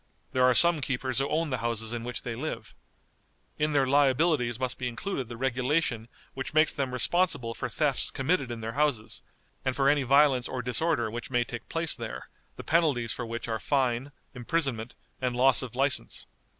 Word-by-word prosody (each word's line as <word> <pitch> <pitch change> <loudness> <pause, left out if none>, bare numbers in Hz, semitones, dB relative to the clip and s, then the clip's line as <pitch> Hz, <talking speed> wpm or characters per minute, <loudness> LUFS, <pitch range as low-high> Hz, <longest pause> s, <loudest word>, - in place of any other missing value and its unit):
There 130 - 0
are 125 -1 +5
some 170 0 +7
keepers 130 -1 -1
who 135 - 0
own 160 -1 -1
the 125 - -1
houses 115 -1 -1
in 120 -1 -4
which 120 0 -4
they 115 -2 -4
live. 150 +7 -6 0.9
In 150 0 +1
their 140 -2 +3
liabilities 135 -2 +2
must 130 -1 -2
be 125 - -2
included 125 - -4
the 120 - -7
regulation 130 -1 0 0.3
which 135 +3 -6
makes 155 0 +4
them 135 -2 -2
responsible 125 -2 0
for - - -4
thefts 145 -4 0
committed 135 -1 -1
in 115 -1 -6
their 110 +1 -4
houses, 135 -5 -1 0.4
and 130 -1 -1
for 135 0 +3
any 145 0 +3
violence 135 -1 +4
or 125 -2 -4
disorder 125 -2 0
which 120 +3 -6
may 120 -2 +1
take 120 0 -8
place 165 -1 +1
there, 65 - -7 0.3
the - - -9
penalties 145 -8 +1
for 120 - -5
which 115 +1 -5
are 110 -1 -2
fine, 130 0 0 0.2
imprisonment, 125 -3 -2 0.3
and 125 -1 -1
loss 130 +1 +5
of 125 -2 -6
license. 135 +1 -1
130 Hz, 190 wpm, -28 LUFS, 120-145 Hz, 0.9 s, some